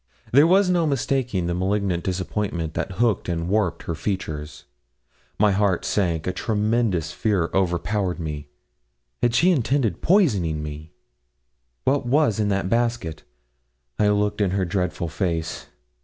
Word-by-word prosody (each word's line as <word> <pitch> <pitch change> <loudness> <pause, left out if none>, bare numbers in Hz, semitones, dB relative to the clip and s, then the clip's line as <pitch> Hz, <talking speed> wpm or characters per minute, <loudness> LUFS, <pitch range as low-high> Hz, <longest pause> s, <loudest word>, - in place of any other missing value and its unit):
There 145 +5 +7
was 190 +2 +4
no 175 -3 +2
mistaking 130 - 0
the 85 - -1
malignant 95 -1 0
disappointment 90 -3 -2
that 95 - -3
hooked 110 -1 +1
and 85 -1 -2
warped 95 -4 0
her 85 - -3
features 80 -5 -4 0.7
my 105 0 +4
heart 100 -2 +1
sank 85 -6 0
a 90 - -1
tremendous 105 -5 0
fear 95 -4 0
overpowered 95 +1 0
me. 75 -3 -5 0.7
Had 120 -1 +2
she 180 +8 +5
intended 130 - +1
poisoning 100 - +2
me? 75 +1 -7 0.9
What 135 - +1
was 135 -5 +2
in 105 -1 +1
that 95 -1 0
basket? 115 -6 -1 0.8
I 105 - +4
looked 105 0 +1
in 100 - +2
her 95 - +1
dreadful 90 -1 -2
face. 85 -1 -3
100 Hz, 140 wpm, -23 LUFS, 85-115 Hz, 0.9 s, There